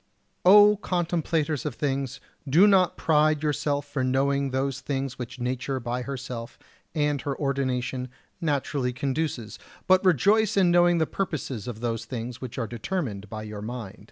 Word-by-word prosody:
45. 190 Hz, +3 st, +9 dB
O 210 Hz, 0 st, +5 dB
contemplators 165 Hz, -5 st, -1 dB
of 150 Hz, -6 st, -4 dB
things, 135 Hz, -3 st, -2 dB, 0.3 s
do 170 Hz, +9 st, +6 dB
not 190 Hz, -3 st, +4 dB
pride 155 Hz, -1 st, +2 dB
yourselves 145 Hz, -1 st, -1 dB
for 140 Hz, -2 st, -2 dB
knowing 135 Hz, +2 st, +1 dB
those 135 Hz, 0 st, -1 dB
things 135 Hz, -2 st, -3 dB
which 125 Hz, +1 st, -7 dB
nature 130 Hz, +2 st, -2 dB
by 120 Hz, +1 st, -3 dB
herself 125 Hz, -3 st, -6 dB, 0.4 s
and 145 Hz, -2 st, +1 dB
her 140 Hz, 0 st, -3 dB
ordination 130 Hz, -2 st, -1 dB, 0.3 s
naturally 140 Hz, -4 st, -1 dB
conduces; 130 Hz, -3 st, -3 dB, 0.3 s
but 185 Hz, +1 st, +4 dB
rejoice 200 Hz, -, +3 dB
in 185 Hz, -3 st, +5 dB
knowing 175 Hz, 0 st, +5 dB
the 160 Hz, -, +2 dB
purposes 145 Hz, -, -4 dB
of 115 Hz, -2 st, -6 dB
those 115 Hz, -1 st, -2 dB
things 120 Hz, 0 st, -6 dB
which 130 Hz, -3 st, -7 dB
are 120 Hz, -, -1 dB
determined 115 Hz, -, -4 dB
by 110 Hz, 0 st, -6 dB
your 105 Hz, -1 st, -7 dB
mind. 110 Hz, -3 st, -6 dB
135 Hz, 155 wpm, -26 LUFS, 125-155 Hz, 0.4 s, 45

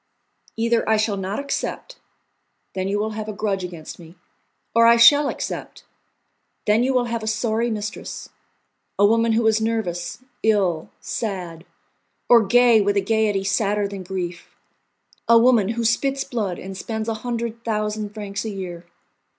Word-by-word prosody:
"Either 230 Hz, 0 st, +1 dB
I 220 Hz, -, +4 dB
shall 215 Hz, -1 st, 0 dB
not 195 Hz, +1 st, -3 dB
accept: 285 Hz, -, -4 dB, 0.7 s
then 190 Hz, 0 st, -2 dB
you 200 Hz, +1 st, 0 dB
will 215 Hz, +1 st, -1 dB
have 215 Hz, 0 st, -5 dB
a -, -, -4 dB
grudge 200 Hz, -2 st, -2 dB
against 170 Hz, -3 st, -8 dB
me; 165 Hz, 0 st, -14 dB, 0.6 s
or 230 Hz, 0 st, +6 dB
I 235 Hz, 0 st, +7 dB
shall 285 Hz, +5 st, +7 dB
accept: -, -, -6 dB, 0.8 s
then 210 Hz, +2 st, +3 dB
you 260 Hz, +2 st, +2 dB
will 250 Hz, -2 st, +2 dB
have 230 Hz, -1 st, -3 dB
a 220 Hz, -, -6 dB
sorry 225 Hz, +1 st, 0 dB
mistress; 210 Hz, -2 st, -5 dB, 0.7 s
a 205 Hz, -, +5 dB
woman 230 Hz, +2 st, +3 dB
who 225 Hz, +1 st, +1 dB
is 220 Hz, 0 st, +3 dB
nervous, 220 Hz, -6 st, -2 dB, 0.2 s
ill, 190 Hz, -7 st, +1 dB
sad, 180 Hz, -6 st, -5 dB, 0.6 s
or 235 Hz, -2 st, +7 dB
gay 240 Hz, +1 st, +5 dB
with 205 Hz, 0 st, +1 dB
a -, -, +3 dB
gaiety 210 Hz, -1 st, +1 dB
sadder 200 Hz, +1 st, 0 dB
than 200 Hz, -1 st, -7 dB
grief, 180 Hz, -2 st, -6 dB, 0.7 s
a 235 Hz, -, +8 dB
woman 230 Hz, -4 st, +4 dB
who 230 Hz, 0 st, -2 dB
spits 270 Hz, +4 st, +1 dB
blood 205 Hz, -7 st, -3 dB
and 190 Hz, 0 st, -8 dB
spends 220 Hz, +3 st, -4 dB
a 225 Hz, -, 0 dB
hundred 235 Hz, -1 st, -4 dB
thousand 215 Hz, -2 st, -2 dB
francs 205 Hz, -2 st, -5 dB
a 220 Hz, -, -4 dB
year. 180 Hz, -4 st, -7 dB
215 Hz, 160 wpm, -22 LUFS, 195-230 Hz, 0.8 s, a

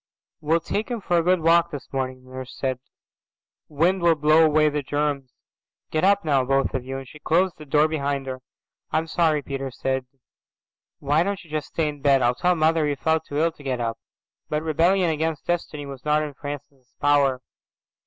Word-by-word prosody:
"We'll 160 Hz, +2 st, +1 dB
take 210 Hz, +7 st, -3 dB
him 240 Hz, -2 st, -2 dB
for 175 Hz, -3 st, +1 dB
a -, -, +3 dB
good 180 Hz, +1 st, +2 dB
walk 170 Hz, +1 st, +4 dB
this 145 Hz, -4 st, -9 dB
morning," 130 Hz, -1 st, -3 dB
the 130 Hz, -, -17 dB
nurse 130 Hz, 0 st, -8 dB
said. 130 Hz, -2 st, -2 dB, 0.9 s
"Wind'll 170 Hz, +2 st, +3 dB
blow 155 Hz, +2 st, +5 dB
away 155 Hz, -1 st, +4 dB
the 150 Hz, 0 st, 0 dB
germs. 145 Hz, -1 st, -2 dB, 0.6 s
Get 155 Hz, -, 0 dB
up 200 Hz, 0 st, +3 dB
now, 140 Hz, -4 st, +3 dB
both 135 Hz, +1 st, +1 dB
of 130 Hz, -, -2 dB
you," 135 Hz, +1 st, -5 dB
and 135 Hz, -1 st, -8 dB
she 150 Hz, -, -13 dB
closed 175 Hz, +4 st, +1 dB
the 155 Hz, -, -11 dB
door 150 Hz, +2 st, +4 dB
behind 140 Hz, -3 st, -2 dB
her. 130 Hz, -1 st, -6 dB, 0.5 s
"I'm 160 Hz, +1 st, 0 dB
sorry," 160 Hz, -2 st, +1 dB
Peter 135 Hz, -1 st, -4 dB
said. 130 Hz, 0 st, -2 dB, 0.9 s
"Why 145 Hz, +3 st, +1 dB
don't 200 Hz, +1 st, -2 dB
you 160 Hz, -, -18 dB
just 155 Hz, -2 st, -2 dB
stay 160 Hz, -2 st, -1 dB
in 145 Hz, -1 st, -6 dB
bed? 135 Hz, -2 st, +4 dB
I'll 120 Hz, +1 st, +3 dB
tell 180 Hz, +7 st, +1 dB
mother 160 Hz, -1 st, +2 dB
you 145 Hz, -, 0 dB
felt 160 Hz, +2 st, 0 dB
too 145 Hz, -, -5 dB
ill 165 Hz, +2 st, +2 dB
to 155 Hz, -, -17 dB
get 130 Hz, -3 st, -2 dB
up." 115 Hz, -1 st, -2 dB, 0.5 s
But 150 Hz, +1 st, -1 dB
rebellion 170 Hz, +3 st, +2 dB
against 160 Hz, -1 st, -2 dB
destiny 160 Hz, -4 st, -2 dB
was 135 Hz, -2 st, -9 dB
not 150 Hz, 0 st, +2 dB
in 150 Hz, -1 st, -5 dB
Francis's 140 Hz, -2 st, -9 dB
power. 140 Hz, -3 st, +2 dB
150 Hz, 200 wpm, -24 LUFS, 135-165 Hz, 0.9 s, blow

